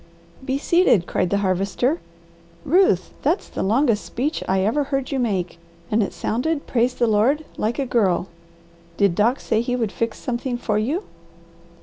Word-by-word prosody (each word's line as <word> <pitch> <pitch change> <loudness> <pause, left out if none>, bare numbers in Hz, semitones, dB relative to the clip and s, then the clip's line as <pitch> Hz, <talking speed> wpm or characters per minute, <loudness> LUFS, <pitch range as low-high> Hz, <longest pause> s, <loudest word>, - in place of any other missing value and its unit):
"Be 265 +1 -1
seated!" 295 - +3
cried 180 - 0
the 200 - +1
Harvester. 195 - 0 0.7
"Ruth, 300 - +3
that's 325 +8 0
the - - -5
longest 225 +1 +2
speech 285 +7 -2
I 190 0 +2
ever 275 +9 +1
heard 270 -1 -2
you 270 - 0
make, 185 -8 -1 0.3
and 215 +1 +3
it 200 - -1
sounded, 285 +7 -2
praise 245 0 +1
the 240 - +2
Lord, 235 +8 +2
like 220 +2 -1
a 275 - 0
girl. 195 -8 +1 0.7
Did 200 -3 +3
Doc 230 +8 +2
say 220 - 0
he 245 +1 -1
would 225 -5 -1
fix 230 +1 -2
something 245 0 -3
for 210 -3 0
you?" 290 - -1
235 Hz, 165 wpm, -22 LUFS, 205-275 Hz, 0.7 s, seated